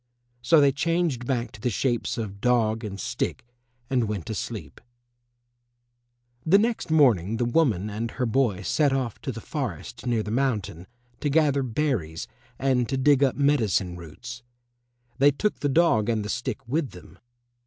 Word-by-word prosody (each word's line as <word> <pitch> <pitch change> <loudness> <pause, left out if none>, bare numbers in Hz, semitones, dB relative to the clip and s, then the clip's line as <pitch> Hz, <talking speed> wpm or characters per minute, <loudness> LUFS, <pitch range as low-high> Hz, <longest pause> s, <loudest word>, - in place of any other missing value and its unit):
So 135 +7 +5
they 140 -1 +5
changed 155 -4 0
back 125 -3 -1
to 105 - -13
the 125 - +1
shapes 120 +2 -1
of 100 -3 -5
dog 115 -2 +2
and 100 -2 -6
stick 115 - -3 0.4
and 125 -4 +1
went 100 -6 -3
to - - -4
sleep. - - -6 1.6
The 175 +5 +5
next 225 -2 0
morning 115 - +3
the 120 - 0
woman 120 - +2
and 110 +2 -3
her 125 - -2
boy 115 -5 +1
set 145 +6 +2
off 130 -5 -2
to 135 - -3
the 115 - -7
forest 115 - -5
near 115 -3 +1
the 105 - -5
mountain, 105 -9 -1 0.3
to 150 - -1
gather 145 -2 +3
berries 115 - -2 0.3
and 125 -3 +1
to 135 - 0
dig 140 +1 +4
up 135 - +2
medicine 115 -11 +1
roots. 105 +9 -9 0.8
They 140 +2 +7
took 205 +9 -1
the 145 - 0
dog 130 -8 +3
and 110 -3 0
the - - -5
stick 115 +1 -4
with 140 +2 -1
them. - - -14
125 Hz, 165 wpm, -25 LUFS, 105-140 Hz, 1.6 s, They